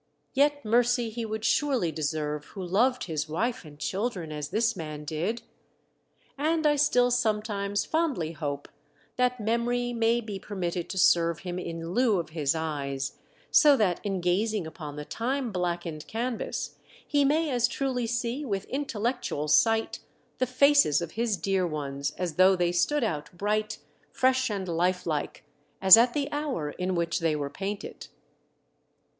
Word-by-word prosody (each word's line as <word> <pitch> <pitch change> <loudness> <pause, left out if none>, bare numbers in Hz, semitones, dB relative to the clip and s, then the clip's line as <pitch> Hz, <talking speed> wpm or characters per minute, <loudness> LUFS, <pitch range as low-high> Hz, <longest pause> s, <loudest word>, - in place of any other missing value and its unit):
Yet 285 -1 +2
mercy 240 +1 +2
he 230 +1 -4
would 220 0 -4
surely 255 - +2
deserve 150 -1 -2
who 190 - -8
loved 240 +8 +2
his 155 -2 -3
wife 225 +10 -1
and 150 -3 -13
children 190 -1 -3
as 150 -1 -5
this 225 +4 +1
man 155 -3 -6
did. 180 +10 -2 1.0
And 315 +2 +1
I 295 -1 +5
still 250 -4 +3
sometimes 210 -4 0
fondly 300 - 0
hope 145 -3 -4 0.5
that 250 0 +1
memory 240 +2 0
may 230 0 +2
be 210 -4 -6
permitted 180 -4 -4
to 190 - -5
serve 170 -2 +3
him 180 -1 -4
in 165 -1 -5
lieu 235 -3 +3
of 165 - -5
his 155 -1 0
eyes, 140 -4 -3 0.3
so 290 -3 +7
that 185 -6 +1
in 195 -3 -2
gazing 195 +2 0
upon 155 -2 -8
the 150 0 -6
time 250 - -2
blackened 175 -4 -3
canvas 235 +1 -3 0.3
he 290 -1 +2
may 305 +2 +2
as 245 -1 +2
truly 250 -2 -2
see 240 +4 -2
with 200 -7 -3
intellectual 240 - -2
sight 220 +10 +3 0.4
the 255 - +1
faces 280 - +4
of 165 - -6
his 225 -3 -1
dear 185 +1 0
ones 140 -3 -3
as 180 -3 -3
though 190 +1 +6
they 175 -1 +1
stood 290 +11 +1
out 155 -9 -2
bright, 215 +2 -1 0.3
fresh 260 0 +2
and 195 -3 -3
life 180 +2 0
like, 150 -2 -3 0.3
as 190 -1 +10
at 240 +2 +3
the 285 -1 0
hour 285 - -2
in 180 +3 -2
which 170 -1 0
they 165 -2 +1
were 145 -1 -3
painted. 195 +5 -6
200 Hz, 160 wpm, -27 LUFS, 165-245 Hz, 1.0 s, as